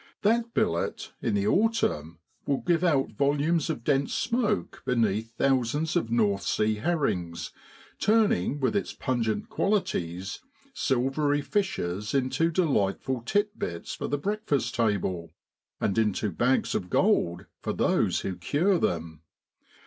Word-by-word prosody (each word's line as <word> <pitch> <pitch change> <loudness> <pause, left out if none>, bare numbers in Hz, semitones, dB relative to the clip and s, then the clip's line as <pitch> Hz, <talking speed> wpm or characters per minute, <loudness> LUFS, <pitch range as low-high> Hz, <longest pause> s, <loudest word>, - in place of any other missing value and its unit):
That 230 +2 +2
billet, 220 0 -1
in 115 -4 0
the 100 0 +1
autumn, 195 - +1 0.3
will 140 - +1
give 175 -1 +1
out 145 -7 +2
volumes 145 +4 +1
of 135 -8 -3
dense 140 +1 +1
smoke 230 -3 -1
beneath 115 -2 0
thousands 135 +4 +1
of 115 - +1
North 105 -4 +2
Sea 105 +2 +1
herrings, 105 - -1 0.5
turning 205 - +2
with 135 +8 0
its 200 - -1
pungent 115 -4 -1
qualities 95 - -1 0.3
silvery 145 - +1
fishes 105 - -1
into 135 +5 +2
delightful 130 - 0
tit 205 0 0
bits 85 -1 -4
for - - -4
the 145 - 0
breakfast 145 - -1
table, 95 -6 0 0.5
and 100 - 0
into 105 -1 +1
bags 125 +9 +1
of 90 - -2
gold 85 0 +2 0.2
for - - -2
those - - +1
who 95 - -3
cure 165 - +1
them. 80 - -2
130 Hz, 130 wpm, -27 LUFS, -, 0.5 s, That